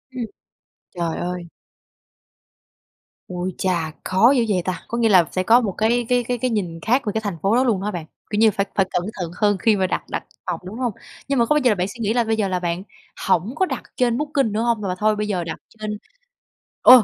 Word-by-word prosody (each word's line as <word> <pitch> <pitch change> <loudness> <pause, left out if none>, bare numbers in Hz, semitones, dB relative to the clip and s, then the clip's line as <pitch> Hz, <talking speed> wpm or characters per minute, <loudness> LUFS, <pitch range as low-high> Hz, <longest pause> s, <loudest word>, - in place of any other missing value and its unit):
Ừm. 245 -2 -2 0.7
Trời 170 -2 -2
ơi. 180 0 -3 1.8
Ui 180 0 -4
chà! 170 -4 0
Khó 190 +7 +5
dữ 250 -4 +3
vậy 185 -3 +2
ta. 185 -1 -3
Có 235 - -3
nghĩa 230 -1 +3
là 185 -4 +6
sẽ 185 - 0
có 230 +5 +6
một 215 -5 -1
cái 235 +2 +2
cái 245 -1 +3
cái 245 +1 -2
cái 255 +2 0
nhìn 180 -7 -2
khác 245 +5 +2
về 210 - 0
cái 220 - -1
thành 200 -5 -3
phố 200 +6 +3
đó 255 - +4
luôn 225 -7 +1
hả 210 +1 -2
bạn? 175 -5 -5 0.2
Kiểu 210 - -1
như, 220 -1 +6
phải 195 0 0
phải 195 - +3
cẩn 175 - 0
thận 175 -3 -4
hơn 205 -1 +4
khi 215 +3 +3
mà 190 -2 +1
đặt - - -2
đặt - - -3 0.2
phòng, 175 -2 -2
đúng 195 +5 -7
hông? 245 -4 0 0.3
Nhưng 275 -1 +1
mà 235 - +5
có 265 - +2
bao - - +5
giờ 250 - +5
là - - +2
bạn 180 -1 0
suy 220 +4 -10
nghĩ 220 -1 +1
là 240 0 +3
bây 225 0 0
giờ 210 -2 0
là 185 -1 -1
bạn 175 +1 -2 0.4
hổng 190 - +2
có 375 - +2
đặt - - -4
trên 240 -2 +2
Booking 285 -5 0
nữa 215 +2 0
hông? 235 -2 +1
Mà 185 -2 -2
thôi 215 0 +3
bây 210 0 -2
giờ 185 -4 -1
đặt 165 - -5
trên 215 -1 -5 0.8
ồ 250 -2 +9
210 Hz, 250 wpm, -22 LUFS, 185-235 Hz, 1.8 s, ồ